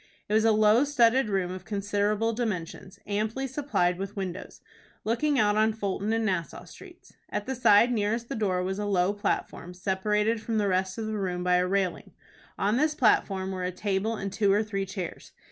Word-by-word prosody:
It 210 - -3
was 220 +1 +3
a 225 - +5
low 215 +3 +5
studded 260 -4 +3
room 190 -3 -1
of 185 0 -7
considerable 205 +2 0
dimensions, 200 -4 -4
amply 215 +6 -2
supplied 260 -10 0
with 195 +1 -5
windows, 190 -3 -6 0.4
looking 275 +6 +1
out 210 -3 +3
on 220 +1 +3
Fulton 205 0 -2
and 225 0 0
Nassau 175 -5 -2
Streets. 350 - -15 0.2
At 210 0 -3
the 265 - -2
side 235 -1 +5
nearest 225 +1 -1
the - - -4
door 190 -5 0
was 190 +2 -3
a 205 - -2
low 190 0 +2
platform, 180 -3 -3
separated 210 +4 0
from 225 0 -2
the 205 -1 +1
rest 185 0 0
of 225 - -3
the 215 -1 -3
room 180 -2 -2
by 180 0 +3
a 180 0 +1
railing. 190 -1 -1 0.4
On 210 +4 +1
this 305 +2 +1
platform 195 -7 +2
were 185 -1 -4
a 180 - -1
table 200 +4 -1
and 195 -2 -5
two 205 -1 +2
or 205 +2 +3
three 195 -2 -3
chairs. 185 -3 -7
205 Hz, 195 wpm, -27 LUFS, 190-225 Hz, 0.4 s, a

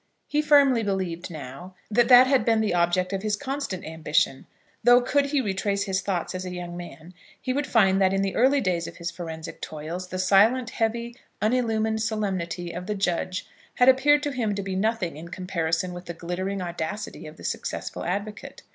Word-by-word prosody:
He 295 - +1
firmly 285 -5 +5
believed 190 -5 -2
now, 155 +4 -9 0.2
that 235 +2 +4
that 250 0 +9
had 265 0 +3
been 225 -1 +3
the 215 -4 +1
object 175 +2 +1
of 195 - -1
his 210 0 0
constant 270 -7 -4
ambition; 155 -3 0 0.4
though 245 +1 +7
could 280 +3 +1
he 280 -1 +1
retrace 200 -1 -1
his 190 -2 -1
thoughts 185 -3 -2
as 185 0 -4
a 185 - -5
young 175 -1 -6
man, 175 0 -10 0.3
he 255 - -2
would 285 +1 -1
find 195 -4 +4
that 190 -1 +4
in 195 0 +1
the 195 - -2
early 270 +4 +4
days 175 -5 0
of - - -10
his 170 0 -4
forensic 165 -2 -7
toils, 160 +4 -6
the 185 - -5
silent, 215 +6 +4
heavy, 235 +1 -2 0.2
unillumined 220 -1 +1
solemnity 190 -6 -2
of 180 +2 -6
the 210 - -1
judge 185 -1 -1 0.3
had 250 - +4
appeared 290 +3 +5
to 290 - -1
him 225 -6 -1
to 200 - -3
be 190 -1 -3
nothing 200 -5 -1
in 165 +2 -8
comparison 175 -1 -2
with 175 +1 -8
the 170 - -6
glittering 185 +3 -3
audacity 175 +2 -5
of 155 +1 -12
the - - -13
successful - - -4
advocate. 205 +4 -5
195 Hz, 195 wpm, -25 LUFS, 175-230 Hz, 0.4 s, that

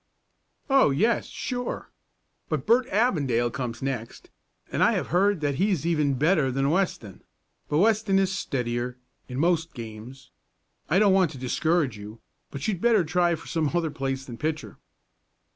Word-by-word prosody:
"Oh, 270 - +5
yes, 215 +13 +1
sure. 245 -1 -5 0.6
But - - -2
Bert 245 +2 +3
Avondale 140 - +1
comes 120 -1 -5
next, 125 -4 -5 0.4
and - - -1
I - - +4
have - - -2
heard 190 0 +2
that 145 -2 -1
he's 190 -6 +1
even 150 -5 +1
better 150 0 +2
than 135 +2 +1
Weston, 160 - -2 0.5
but 150 - +1
Weston 215 +1 +3
is 190 -1 +2
steadier 125 -8 -3 0.3
in 125 - -6
most 165 +1 +1
games. 120 +3 -10 0.6
I 170 - +3
don't 200 -1 +5
want 190 -3 +4
to - - -9
discourage 135 -1 0
you, 105 +2 -10 0.3
but 140 0 -5
you'd 190 -5 -2
better 230 -5 +4
try 175 +1 +1
for 165 - -12
some 160 -3 -1
other 165 -3 0
place 135 -1 -3
than 120 -3 -9
pitcher." 155 0 -4
155 Hz, 160 wpm, -26 LUFS, 130-190 Hz, 0.6 s, Oh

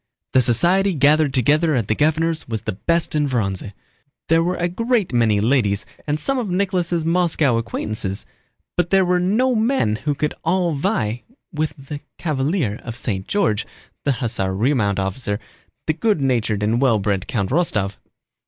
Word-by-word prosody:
The 130 - +6
society 175 - +3
gathered 150 +1 +4
together 150 +5 +3
at 115 -5 0
the - - +2
governor's 160 +4 0
was 110 -2 -3
the 110 - -2
best 165 - 0
in 150 -2 +1
Vorónezh. 100 -5 -2 0.6
There 165 +1 +4
were 180 +2 0
a 175 - 0
great 225 - 0
many 115 -4 +3
ladies 105 -3 +1 0.2
and 150 +1 0
some 270 - 0
of 225 -5 -3
Nicholas' 180 -3 0
Moscow 165 -7 +2
acquaintances, 110 -3 -3 0.5
but 175 -1 +1
there 190 0 +4
were 180 0 +2
no 220 +9 +2
men 220 - +1
who 145 +4 -2
could 150 +1 -1
at - - -25
all 175 0 +1
vie 130 - -1 0.3
with 155 -1 -2
the 140 +1 -7 0.2
cavalier 145 - -1
of 115 0 -6
St. 100 -6 -2
George, 115 - 0 0.4
the 140 - +2
hussar 110 -7 -2
remount 110 -3 +1
officer, 100 +2 -2 0.5
the 155 - +1
good 205 +3 +1
natured 115 -6 0
and 115 +4 +1
well 125 -5 +4
bred 100 -2 -1
Count 100 -4 -2
Rostóv. 105 - 0
140 Hz, 170 wpm, -21 LUFS, 110-170 Hz, 0.6 s, The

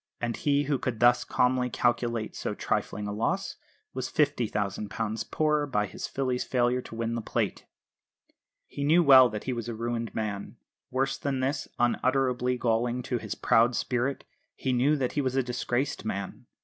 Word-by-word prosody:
And 120 -1 -2
he, 145 0 +1
who 140 -2 0
could 120 -4 -3
thus 120 0 +5
calmly 125 0 +1
calculate 120 -2 0
so - - -3
trifling 105 - -2
a 105 - -3
loss, 110 +2 -1 0.4
was 130 0 -4
£50,000 110 -5 -1
poorer 150 -1 +1
by 105 -6 0
his 95 - -6
filly's 130 -2 -1
failure 125 0 +1
to 115 - -10
win 115 0 -2
the 115 - -2
Plate! - - -2 1.0
He 140 - -5
knew 165 +5 +5
well 130 -4 +8
that 105 -1 -5
he 130 - -2
was 120 -1 -4
a 115 - -4
ruined 115 0 -3
man 105 -2 -4 0.3
worse 135 +1 -1
than 140 -2 -1
this, 135 +3 -1
unutterably 125 +1 +1
galling 120 +1 0
to 125 -1 -2
his - - -5
proud 120 +2 +3
spirit 125 +4 -1 0.3
he 130 - -1
knew 135 +5 +3
that 130 -4 -1
he 145 - 0
was 130 -1 -1
a 135 - +2
disgraced 125 +2 -2
man. 100 -3 -5
125 Hz, 175 wpm, -28 LUFS, 115-135 Hz, 1.0 s, well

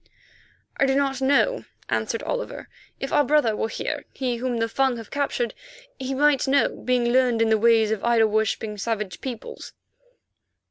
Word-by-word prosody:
"I 275 - +3
do 270 - +2
not 270 -1 0
know," 285 - +2 0.2
answered - - -2
Oliver. - - -4 0.3
"If - - -4
our 290 - +5
brother 265 -6 +2
were 220 - -2
here, - - -4
he 250 -3 -2
whom 245 0 -2
the 225 0 0
Fung 265 +1 +1
have 225 -2 -10
captured, 275 -5 -1 0.5
he 265 0 -3
might 285 -1 +3
know, 275 +1 +3
being 250 -1 0
learned 250 -2 +3
in 225 0 +3
the 220 - +4
ways 225 -1 +4
of 220 -3 -2
idol 230 -2 +3
worshipping, 215 0 -1
savage 210 -3 -3
peoples." 245 -4 -7
245 Hz, 170 wpm, -24 LUFS, 225-270 Hz, 0.5 s, our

